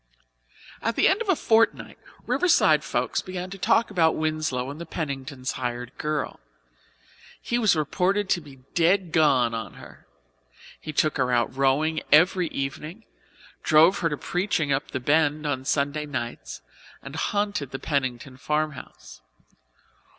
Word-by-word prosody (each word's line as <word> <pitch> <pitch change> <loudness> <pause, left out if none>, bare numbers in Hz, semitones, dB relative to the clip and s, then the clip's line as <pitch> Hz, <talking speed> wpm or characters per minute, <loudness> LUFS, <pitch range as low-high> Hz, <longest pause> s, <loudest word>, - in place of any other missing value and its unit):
At 230 0 -1
the - - +4
end 395 +4 +2
of 445 - -4
a 380 - +5
fortnight 225 -5 +1 0.3
Riverside 365 -3 +3
folks - - -1
began 185 -1 -6
to 195 - -8
talk 225 +4 +2
about 165 -5 +3
Winslow 155 -5 -2
and 150 +4 -9
the - - -6
Penningtons' 135 -5 -4
hired 125 -1 -5
girl. 150 -1 -3 1.0
He 240 - -1
was 215 -6 +3
reported 185 +6 0
to 175 - +1
be 140 -4 -15
"dead 175 +1 +2
gone" 135 -7 +3
on 110 -4 -5
her; - - -14 0.7
he 155 - -6
took 155 +1 +1
her 130 -2 +1
out 120 +1 +1
rowing 140 +4 +1
every 175 +3 +5
evening, 155 +9 -5 0.6
drove 160 +5 +5
her 165 - +1
to 150 - -3
preaching 175 -4 -1
up 135 +2 -1
the 130 - -3
Bend 150 +3 +1
on 135 -3 -2
Sunday 145 +2 -1
nights, 120 - -6 0.4
and 140 +2 -9
haunted 205 -5 -1
the 135 - -5
Pennington 130 -3 -3
farmhouse. 150 0 -4
150 Hz, 145 wpm, -25 LUFS, 135-180 Hz, 1.0 s, a